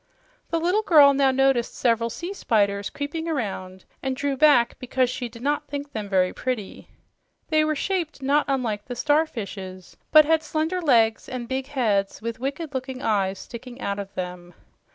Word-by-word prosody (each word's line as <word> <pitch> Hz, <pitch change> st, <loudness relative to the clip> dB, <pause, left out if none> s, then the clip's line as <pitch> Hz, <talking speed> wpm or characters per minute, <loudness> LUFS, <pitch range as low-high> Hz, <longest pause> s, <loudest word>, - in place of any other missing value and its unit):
The 330 Hz, -, 0 dB
little 360 Hz, +6 st, +2 dB
girl 300 Hz, -9 st, +7 dB
now 275 Hz, -1 st, +3 dB
noticed 265 Hz, -2 st, +2 dB
several 230 Hz, -1 st, +1 dB
sea 345 Hz, -, -5 dB
spiders 200 Hz, -, +1 dB
creeping 305 Hz, +3 st, -4 dB
around 190 Hz, -, -4 dB, 0.2 s
and 265 Hz, -1 st, -2 dB
drew 280 Hz, +1 st, -1 dB
back 265 Hz, -5 st, +4 dB
because 255 Hz, 0 st, 0 dB
she 250 Hz, -1 st, -4 dB
did 230 Hz, +1 st, -12 dB
not 290 Hz, +1 st, 0 dB
think 285 Hz, 0 st, -5 dB
them 210 Hz, -2 st, -5 dB
very 185 Hz, -2 st, +2 dB
pretty. 250 Hz, -6 st, -4 dB, 0.6 s
They 310 Hz, -1 st, +3 dB
were 310 Hz, 0 st, 0 dB
shaped 335 Hz, -2 st, -2 dB
not 280 Hz, +2 st, +2 dB
unlike 240 Hz, -7 st, -1 dB
the 245 Hz, -, -6 dB
starfishes, 215 Hz, -, -2 dB, 0.2 s
but 310 Hz, 0 st, +8 dB
had 320 Hz, +1 st, +3 dB
slender 320 Hz, +4 st, -2 dB
legs 230 Hz, -8 st, +3 dB
and 245 Hz, -2 st, -5 dB
big 265 Hz, +1 st, -3 dB
heads 210 Hz, -8 st, 0 dB
with 230 Hz, +1 st, -5 dB
wicked 280 Hz, +4 st, -4 dB
looking 260 Hz, 0 st, -5 dB
eyes 195 Hz, -3 st, +1 dB
sticking 245 Hz, +4 st, -10 dB
out 200 Hz, -4 st, -3 dB
of 200 Hz, -1 st, -6 dB
them. 180 Hz, -1 st, -6 dB
255 Hz, 175 wpm, -24 LUFS, 215-290 Hz, 0.6 s, but